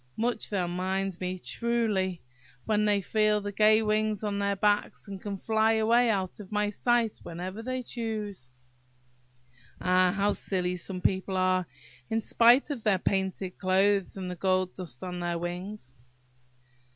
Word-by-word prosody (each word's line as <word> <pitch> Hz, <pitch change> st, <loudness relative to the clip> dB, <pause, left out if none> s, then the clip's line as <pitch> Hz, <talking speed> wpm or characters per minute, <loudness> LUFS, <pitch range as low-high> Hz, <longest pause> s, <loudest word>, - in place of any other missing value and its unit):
Much 235 Hz, 0 st, -1 dB
they'll 185 Hz, -4 st, 0 dB
mind 190 Hz, +2 st, -1 dB
me, 185 Hz, 0 st, -2 dB
truly, 210 Hz, -5 st, -1 dB, 0.4 s
when 210 Hz, -1 st, +2 dB
they 205 Hz, -1 st, +2 dB
feel 215 Hz, +2 st, +2 dB
the 205 Hz, 0 st, -5 dB
gay 215 Hz, +2 st, +4 dB
wings 215 Hz, -1 st, 0 dB
on 205 Hz, -1 st, -1 dB
their 200 Hz, 0 st, +1 dB
backs, 205 Hz, +2 st, 0 dB
and 195 Hz, -1 st, -7 dB
can 200 Hz, -1 st, -4 dB
fly 220 Hz, +2 st, +2 dB
away 230 Hz, +2 st, +3 dB
out 190 Hz, -3 st, -1 dB
of 205 Hz, -1 st, -10 dB
my 210 Hz, 0 st, +1 dB
sight 235 Hz, +1 st, +2 dB
whenever 185 Hz, +5 st, -6 dB
they 255 Hz, +2 st, -3 dB
choose! 215 Hz, -, -5 dB, 1.3 s
Ah! 185 Hz, 0 st, +3 dB
how 205 Hz, +1 st, +1 dB
silly 180 Hz, -2 st, -1 dB
some 180 Hz, +1 st, -4 dB
people 190 Hz, 0 st, 0 dB
are, 185 Hz, -1 st, +2 dB, 0.4 s
in 225 Hz, 0 st, +1 dB
spite 240 Hz, +6 st, +4 dB
of 270 Hz, -5 st, -4 dB
their 210 Hz, -3 st, +3 dB
painted 190 Hz, 0 st, -2 dB
clothes 195 Hz, +1 st, +2 dB
and 185 Hz, -1 st, -4 dB
the -, -, -5 dB
gold 185 Hz, 0 st, +1 dB
dust 160 Hz, -10 st, -9 dB
on 180 Hz, -1 st, -4 dB
their 175 Hz, -1 st, -1 dB
wings!" 175 Hz, -3 st, -6 dB
200 Hz, 155 wpm, -28 LUFS, 185-215 Hz, 1.3 s, gay